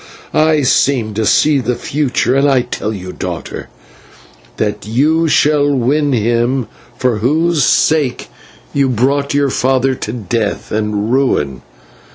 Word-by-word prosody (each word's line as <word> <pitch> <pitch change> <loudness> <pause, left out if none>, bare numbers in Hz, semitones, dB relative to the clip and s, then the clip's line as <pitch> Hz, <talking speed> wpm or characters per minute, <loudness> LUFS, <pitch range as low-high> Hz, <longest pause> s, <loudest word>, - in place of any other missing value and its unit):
I 155 -1 +3
seem 125 -4 +1
to 110 0 -1
see 150 -2 +3
the 125 -1 -1
future, 130 -2 -1
and 140 +1 +3
I 130 -2 +3
tell 110 -2 -4
you, 95 -3 -7
daughter, - - -6 0.9
that 105 -1 -3
you 155 +8 +2
shall 145 -1 +2
win 140 +3 +1
him 120 +2 0 0.3
for 125 -4 0
whose 155 +7 +1
sake 150 -5 +1 0.5
you 140 -1 +1
brought 140 +4 0
your 140 -2 +1
father 130 +1 +1
to 110 - -5
death 110 -1 -3
and 105 0 -1
ruin. 75 - 0
130 Hz, 135 wpm, -15 LUFS, 110-145 Hz, 0.9 s, I